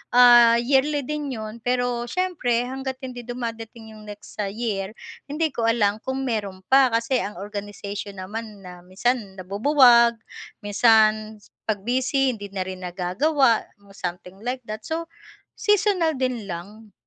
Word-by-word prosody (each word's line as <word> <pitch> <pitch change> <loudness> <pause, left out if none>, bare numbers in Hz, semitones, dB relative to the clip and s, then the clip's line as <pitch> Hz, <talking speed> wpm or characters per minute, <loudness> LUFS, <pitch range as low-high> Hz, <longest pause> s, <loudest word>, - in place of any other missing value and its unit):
ah 240 -1 +8
yearly 275 +4 +2
din 300 0 -3
'yon 220 +1 -7
pero 245 0 -1
siyempre 310 -9 0
hangga't 265 +1 -5
hindi 250 -1 -7
dumadating 230 -2 -6
'yong 215 - -13
next 205 0 -11
sa 205 - 0
year 210 -2 -3 0.3
hindi 305 +2 -1
ko 230 -3 -1
alam 215 -2 +2
kung 265 +1 -2
meron 205 -6 -3
pa, 270 -1 +7
kasi 230 +2 0
ang 205 - -4
organization 200 0 -6
naman 205 +2 -7
na 180 -1 -10
minsan 195 +3 -2
nabubuwag 235 +5 +5 0.5
minsan 215 0 +3 0.3
pag 205 -3 -1
busy 260 +3 +1
hindi 205 -3 -7
na 190 -2 -1
rin 185 0 -7
nagagawa 210 - +1 0.2
mga 200 -1 -21
something 180 +1 -6
like 250 +3 -4
that, 215 -1 -7
so 325 +1 -2 0.6
seasonal 405 -6 +2
din 255 -5 -2
lang. 205 +5 -8
230 Hz, 145 wpm, -23 LUFS, 205-255 Hz, 0.6 s, ah